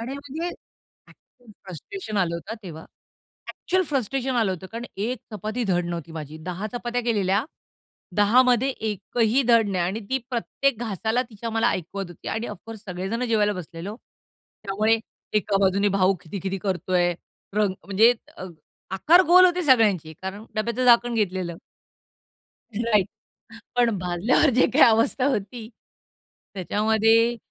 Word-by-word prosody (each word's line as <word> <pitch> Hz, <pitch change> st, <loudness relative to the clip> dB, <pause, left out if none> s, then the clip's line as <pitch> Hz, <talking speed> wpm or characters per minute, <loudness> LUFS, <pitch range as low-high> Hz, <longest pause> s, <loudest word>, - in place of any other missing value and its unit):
आणि 250 Hz, +4 st, -5 dB
म्हणजे 290 Hz, +5 st, -5 dB, 0.9 s
खूप 245 Hz, -3 st, -18 dB
फ्रस्ट्रेशन 215 Hz, -, -7 dB
आलं 170 Hz, -3 st, +1 dB
होतं 185 Hz, +7 st, -6 dB
तेव्हा. 160 Hz, -3 st, -9 dB, 0.7 s
एक्चुअल 370 Hz, 0 st, -1 dB
फ्रस्ट्रेशन 265 Hz, -2 st, -1 dB
आलं 225 Hz, -5 st, +2 dB
होतं. 185 Hz, 0 st, -7 dB
कारण 230 Hz, +1 st, -5 dB
एक 230 Hz, +6 st, -2 dB, 0.2 s
चपाती 215 Hz, +4 st, -3 dB
धड 175 Hz, -3 st, +1 dB
नव्हती 170 Hz, -2 st, -5 dB
माझी. 155 Hz, -1 st, -7 dB
10 180 Hz, +5 st, -5 dB
चपात्या 245 Hz, 0 st, -3 dB
केलेल्या, 200 Hz, -4 st, +1 dB, 0.7 s
10मध्ये 245 Hz, +4 st, +4 dB
एकही 220 Hz, +3 st, 0 dB
धड 230 Hz, -3 st, +5 dB
नाही. 185 Hz, -3 st, 0 dB
आणि 195 Hz, +5 st, -2 dB
ती 265 Hz, -, +2 dB
प्रत्येक 245 Hz, +1 st, -1 dB
घासाला 220 Hz, +2 st, -1 dB
तिच्या 230 Hz, +2 st, -6 dB
मला 225 Hz, 0 st, +2 dB
ऐकवत 195 Hz, +3 st, -4 dB
होती. 175 Hz, -, -9 dB
आणि 225 Hz, +2 st, -3 dB
ऑफ 210 Hz, -, -7 dB
कोर्स 225 Hz, -1 st, -9 dB
सगळे 185 Hz, 0 st, -4 dB
जण 230 Hz, +3 st, -1 dB
जेवायला 215 Hz, -3 st, +2 dB
बसलेलो. 180 Hz, +2 st, -7 dB, 0.7 s
त्यामुळे 215 Hz, +3 st, +2 dB, 0.4 s
एका 205 Hz, -1 st, +1 dB
बाजूने 200 Hz, +1 st, +3 dB
भाऊ 185 Hz, +1 st, +4 dB
खिदि-खिदि 195 Hz, +3 st, -5 dB
करतोय, 180 Hz, -2 st, 0 dB, 0.4 s
रंग 210 Hz, -2 st, +2 dB
म्हणजे 215 Hz, +5 st, +5 dB, 0.2 s
अ, -, -, -7 dB, 0.5 s
आकार 320 Hz, -, +5 dB
गोल 365 Hz, +2 st, +8 dB
होते 360 Hz, 0 st, 0 dB
सगळ्यांचे, 210 Hz, -, +3 dB
कारण 195 Hz, +3 st, -6 dB
डब्याचं 235 Hz, +3 st, -1 dB
झाकण 240 Hz, 0 st, +5 dB
घेतलेलं. 185 Hz, -5 st, -2 dB, 1.2 s
राइट 215 Hz, -4 st, +2 dB, 0.7 s
पण 240 Hz, -1 st, +4 dB
भाजल्यावर 180 Hz, -, +2 dB
जे 255 Hz, -, +5 dB
काही 285 Hz, -, +5 dB
अवस्था 230 Hz, +3 st, +3 dB
होती. 225 Hz, -2 st, -3 dB, 0.9 s
त्याच्यामध्ये 220 Hz, +4 st, +2 dB
215 Hz, 140 wpm, -24 LUFS, 190-240 Hz, 1.2 s, गोल